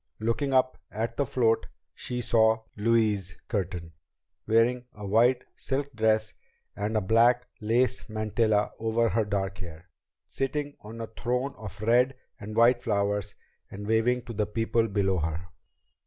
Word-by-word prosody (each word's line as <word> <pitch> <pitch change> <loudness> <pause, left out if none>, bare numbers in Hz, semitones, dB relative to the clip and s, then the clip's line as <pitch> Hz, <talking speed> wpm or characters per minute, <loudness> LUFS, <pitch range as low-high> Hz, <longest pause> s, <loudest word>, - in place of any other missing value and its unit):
Looking 115 +5 0
up 130 -1 +2
at 110 +2 -3
the 140 - 0
float, 115 -3 +2 0.3
she 125 0 -3
saw 110 -1 +3
Louise 105 -4 +1
Curtin, 90 -5 -3 0.6
wearing 120 +3 +3
a 105 -1 -8
white 120 +5 +3
silk 140 +1 -3
dress 110 -1 +1 0.4
and 105 +2 -1
a - - +2
black 120 +5 +4
lace 115 +3 +1
mantilla 110 0 +1
over 115 +1 +1
her 110 +3 +1
dark 95 -2 -2
hair, 85 -1 -10 0.3
sitting 145 +1 -3
on 115 +2 -8
a - - -2
throne 125 +4 -2
of 105 -2 -9
red 125 +4 +3 0.2
and 105 +2 -7
white 120 +2 +5
flowers 105 -2 -1 0.3
and 100 +1 -7
waving 115 +3 +2
to 120 - -8
the 105 -1 0
people 115 +1 +1
below 100 -3 +1
her. 80 +3 -3
110 Hz, 145 wpm, -28 LUFS, 105-120 Hz, 0.6 s, white